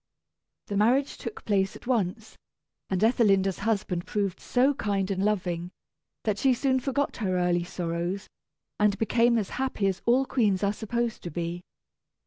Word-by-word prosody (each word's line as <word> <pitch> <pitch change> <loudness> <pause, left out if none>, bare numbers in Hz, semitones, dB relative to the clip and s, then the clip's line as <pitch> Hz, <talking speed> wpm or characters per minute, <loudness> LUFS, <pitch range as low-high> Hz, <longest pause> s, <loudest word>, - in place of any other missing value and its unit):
The 200 - -3
marriage 250 +7 +3
took 455 +1 -7
place 195 -2 +1
at - - -12
once; 220 -3 -1 0.5
and 190 +1 0
Ethelinda's 195 -5 +3
husband 200 -5 -1
proved 200 -3 -1
so 260 +3 +2
kind 200 -6 -1
and 190 0 -1
loving, 180 -4 -1 0.5
that 210 -2 0
she 265 -2 +4
soon 260 +1 +1
forgot 275 +2 -1
her 185 -5 0
early 175 -1 +2
sorrows, 175 +2 -3 0.5
and 210 -1 +3
became 235 +2 +3
as 205 -4 -2
happy 260 -6 -1
as 190 -1 0
all 255 +3 +4
queens 210 -8 +1
are 200 0 +2
supposed 235 +2 -2
to 175 - -5
be. 170 +2 -4
205 Hz, 155 wpm, -27 LUFS, 185-235 Hz, 0.5 s, she